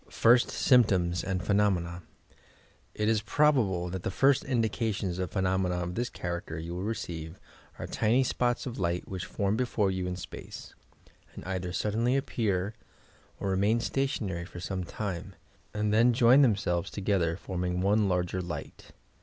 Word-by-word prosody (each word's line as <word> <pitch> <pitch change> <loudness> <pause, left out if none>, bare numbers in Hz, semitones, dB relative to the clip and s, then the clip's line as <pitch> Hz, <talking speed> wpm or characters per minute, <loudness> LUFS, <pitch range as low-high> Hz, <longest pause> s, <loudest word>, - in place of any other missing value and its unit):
FIRST 120 +1 +4
SYMPTOMS 95 -9 +3
AND 95 -2 -2
PHENOMENA 95 -4 +1 0.9
It 105 - 0
is 110 -1 +2
probable 110 -8 +2
that 95 0 -4
the - - -2
first 135 +8 +3
indications 110 -6 -1
of 90 - -2
phenomena 95 -2 0
of 90 0 -3
this 120 +5 -2
character 85 -2 -5
you 85 +2 -5
will 90 - -4
receive 85 -6 -5 0.4
are - - -5
tiny 115 +4 +2
spots 120 -1 0
of 120 -5 -5
light 85 -1 -1
which 90 -3 -5
form 100 0 0
before 110 -5 +1
you 95 -1 -2
in 90 - -3
space, 90 - -9 0.6
and - - -9
either 90 -1 -3
suddenly 115 +7 +1
appear 105 -7 -1 0.7
or 100 - -1
remain 100 +5 +2
stationary 110 -9 -2
for 90 - -10
some 95 +1 -3
time, 90 -1 -5 0.4
and 105 0 -1
then 120 +3 +5
join 120 +4 +6
theoiselves 100 -7 +1
together, 95 -5 0
forming 90 -2 -3
one 100 +2 +2
larger 90 0 0
light. 85 -1 -8
95 Hz, 155 wpm, -29 LUFS, 90-115 Hz, 0.9 s, join